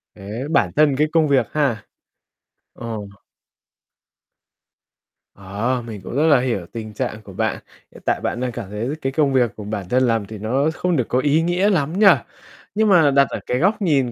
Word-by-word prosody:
Thế 105 Hz, +5 st, -6 dB
bản 145 Hz, -, +2 dB
thân 150 Hz, -2 st, +4 dB
cái 150 Hz, +2 st, +2 dB
công 160 Hz, -2 st, +3 dB
việc 130 Hz, -5 st, +2 dB
ha. 135 Hz, -9 st, 0 dB, 0.9 s
Ờ. 115 Hz, -, -9 dB, 2.5 s
Ờ, 105 Hz, +6 st, -2 dB
mình 105 Hz, -4 st, -7 dB
cũng 120 Hz, -, -7 dB
rất 155 Hz, +3 st, +3 dB
là 145 Hz, -4 st, +5 dB
hiểu 120 Hz, -8 st, -2 dB
tình 110 Hz, -2 st, -7 dB
trạng 105 Hz, +1 st, -4 dB
của 100 Hz, -2 st, -13 dB
bạn. -, -, -1 dB, 0.3 s
Hiện -, -, -15 dB
tại -, -, 0 dB
bạn -, -, -2 dB
đang 125 Hz, -1 st, -2 dB
cảm 115 Hz, -4 st, -7 dB
thấy 105 Hz, +4 st, -4 dB
cái 135 Hz, -, -1 dB
công 140 Hz, -2 st, +1 dB
việc 120 Hz, -4 st, +2 dB
của 105 Hz, -, -8 dB
bản 100 Hz, -3 st, -5 dB
thân 130 Hz, +3 st, +2 dB
làm 115 Hz, -3 st, 0 dB
thì 110 Hz, +1 st, -9 dB
nó 130 Hz, +9 st, 0 dB
không 180 Hz, 0 st, -1 dB
được 125 Hz, -, 0 dB
có 125 Hz, -, +1 dB
ý 150 Hz, +4 st, +2 dB
nghĩa 180 Hz, +4 st, +1 dB
lắm 165 Hz, 0 st, 0 dB
nhỉ. 210 Hz, -, +7 dB, 0.7 s
Nhưng 215 Hz, 0 st, +2 dB
mà 165 Hz, -7 st, +5 dB
đặt 140 Hz, -1 st, +4 dB
ở -, -, -4 dB
cái 125 Hz, -, -1 dB
góc 200 Hz, +5 st, +1 dB
nhìn 140 Hz, -9 st, +2 dB
130 Hz, 200 wpm, -21 LUFS, 110-155 Hz, 2.5 s, nhỉ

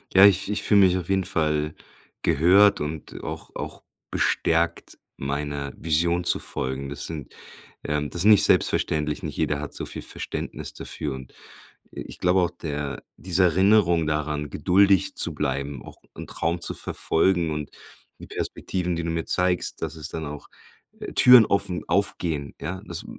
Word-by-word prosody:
Ja, 95 Hz, +1 st, +9 dB
ich 100 Hz, 0 st, +3 dB
ich 105 Hz, -, -1 dB
fühle 100 Hz, -1 st, +4 dB
mich 90 Hz, +1 st, 0 dB
auf 90 Hz, 0 st, -6 dB
jeden 95 Hz, -1 st, +1 dB
Fall 75 Hz, -3 st, -1 dB, 0.5 s
gehört 95 Hz, +7 st, +4 dB
und 75 Hz, +1 st, -6 dB
auch 80 Hz, 0 st, -7 dB
auch -, -, -7 dB, 0.3 s
bestärkt, 85 Hz, +1 st, 0 dB, 0.2 s
meiner 70 Hz, 0 st, -4 dB
Vision 85 Hz, +2 st, +2 dB
zu -, -, +5 dB
folgen. 65 Hz, +1 st, -4 dB
Das 70 Hz, 0 st, -3 dB
sind, 75 Hz, -6 st, -8 dB, 0.5 s
ähm 75 Hz, -1 st, -2 dB
das 85 Hz, -, -3 dB
ist -, -, +2 dB
nicht 105 Hz, -2 st, +7 dB
selbstverständlich, 75 Hz, -1 st, +1 dB
nicht -, -, -5 dB
jeder 75 Hz, -, -1 dB
hat 75 Hz, -, -7 dB
so -, -, -5 dB
viel -, -, -6 dB
Verständnis -, -, -6 dB
dafür 75 Hz, -3 st, -5 dB
und, 65 Hz, -1 st, -11 dB, 0.6 s
äh, -, -, -7 dB
ich -, -, -10 dB
glaube 90 Hz, +1 st, +2 dB
auch, 90 Hz, -1 st, 0 dB
der 75 Hz, -5 st, -6 dB
diese 95 Hz, 0 st, +1 dB
Erinnerung 90 Hz, -2 st, +3 dB
daran, 75 Hz, -1 st, -2 dB
geduldig 95 Hz, 0 st, +2 dB
zu -, -, +3 dB
bleiben, 70 Hz, -2 st, -3 dB
auch -, -, -13 dB, 0.2 s
'n -, -, -8 dB
Traum 85 Hz, +1 st, -2 dB
zu -, -, -1 dB
verfolgen 85 Hz, -1 st, 0 dB
und 75 Hz, -2 st, -5 dB, 0.5 s
die -, -, -11 dB
Perspektiven, 90 Hz, -2 st, -3 dB
die 85 Hz, -, -3 dB
du 85 Hz, -, -2 dB
mir 80 Hz, 0 st, -2 dB
zeigst, 90 Hz, -1 st, 0 dB
dass 80 Hz, 0 st, -3 dB
es 80 Hz, 0 st, -6 dB
dann 80 Hz, -1 st, -6 dB
auch 75 Hz, 0 st, -9 dB, 0.5 s
äh, -, -, -7 dB
Türen 125 Hz, -3 st, +9 dB
offen 95 Hz, -2 st, -1 dB
aufgehen, 85 Hz, -7 st, -1 dB
ja? 95 Hz, +3 st, -5 dB
Das 85 Hz, -1 st, -3 dB
80 Hz, 170 wpm, -24 LUFS, 75-90 Hz, 0.6 s, Ja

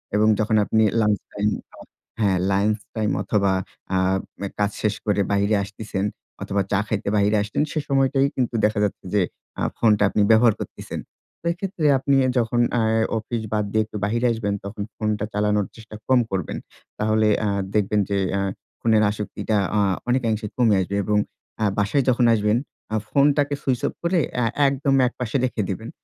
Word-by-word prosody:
এবং 105 Hz, +1 st, +4 dB
যখন 110 Hz, +1 st, +1 dB
আপনি 110 Hz, +1 st, +2 dB, 0.2 s
লাঞ্চ 105 Hz, -2 st, +2 dB
টাইম 105 Hz, +1 st, +1 dB, 0.7 s
হ্যাঁ, 100 Hz, -4 st, +2 dB
লাঞ্চ 105 Hz, +2 st, +2 dB, 0.2 s
টাইম 110 Hz, -2 st, 0 dB
অথবা 100 Hz, -2 st, +1 dB, 0.4 s
আ -, -, +3 dB, 0.4 s
অ্যা 100 Hz, -, -2 dB
কাজ 105 Hz, 0 st, +2 dB
শেষ 105 Hz, -1 st, +1 dB
করে 105 Hz, -1 st, +2 dB
বাহিরে 100 Hz, +1 st, +2 dB
আসতিছেন 100 Hz, -1 st, -4 dB, 0.4 s
অথবা 100 Hz, 0 st, 0 dB
চা 100 Hz, -, +3 dB
খাইতে 100 Hz, -2 st, -2 dB
বাহিরে 105 Hz, +1 st, +3 dB
আসছেন 105 Hz, +5 st, -1 dB
সে 155 Hz, -, -1 dB
সময়টাই 135 Hz, 0 st, +3 dB
কিন্তু 125 Hz, -2 st, -1 dB
দেখা 105 Hz, 0 st, +1 dB
যাচ্ছে 100 Hz, -1 st, -3 dB
যে, 100 Hz, -, +4 dB, 0.4 s
আ -, -, -2 dB, 0.2 s
ফোনটা 105 Hz, -3 st, +3 dB
আপনি 105 Hz, -, +1 dB
ব্যবহার 110 Hz, 0 st, +6 dB
করছেন। -, -, -6 dB, 0.4 s
তো -, -, -19 dB
এক্ষেত্রে 185 Hz, -2 st, -4 dB
আপনি 140 Hz, +1 st, +2 dB, 0.2 s
যখন 120 Hz, 0 st, +1 dB, 0.2 s
আ -, -, +2 dB, 0.4 s
অফিস 115 Hz, +1 st, -3 dB
বাদ 105 Hz, -1 st, +1 dB
দিয়ে 110 Hz, +1 st, +2 dB
একটু 110 Hz, -, -7 dB
বাহিরে 115 Hz, +4 st, +1 dB
আসবেন, 110 Hz, -3 st, -1 dB
তখন 100 Hz, +1 st, -6 dB
ফোনটা 105 Hz, -1 st, -1 dB
চালানোর 105 Hz, 0 st, +1 dB
চেষ্টা 110 Hz, -1 st, -11 dB
কম 130 Hz, -1 st, +5 dB
করবেন। 95 Hz, -4 st, -2 dB, 0.4 s
তাহলে 110 Hz, 0 st, +2 dB, 0.2 s
আ -, -, +1 dB, 0.3 s
দেখবেন 105 Hz, 0 st, +2 dB
যে 100 Hz, -, +1 dB, 0.2 s
আ -, -, 0 dB, 0.4 s
ফোনের 110 Hz, -2 st, +3 dB
আসক্তিটা 105 Hz, +1 st, -2 dB, 0.2 s
আ -, -, +4 dB, 0.3 s
অনেকাংশে 115 Hz, -4 st, 0 dB
কমে 115 Hz, -4 st, +4 dB
আসবে 95 Hz, +2 st, -3 dB
এবং 105 Hz, +1 st, +1 dB, 0.5 s
আ -, -, +3 dB
বাসায় 105 Hz, +7 st, +2 dB
যখন 125 Hz, -1 st, +3 dB
আসবেন, 105 Hz, 0 st, +2 dB, 0.4 s
আ -, -, +2 dB
ফোনটাকে 145 Hz, +1 st, +3 dB
সুইচ 130 Hz, -3 st, 0 dB
অফ -, -, -4 dB
করে 170 Hz, +1 st, +2 dB, 0.2 s
অ্যা 125 Hz, -1 st, +1 dB, 0.2 s
একদম 135 Hz, 0 st, +1 dB
একপাশে 125 Hz, -1 st, -5 dB
রেখে 125 Hz, -4 st, -2 dB
দিবেন। 110 Hz, +4 st, -4 dB
110 Hz, 175 wpm, -23 LUFS, 105-120 Hz, 0.7 s, ব্যবহার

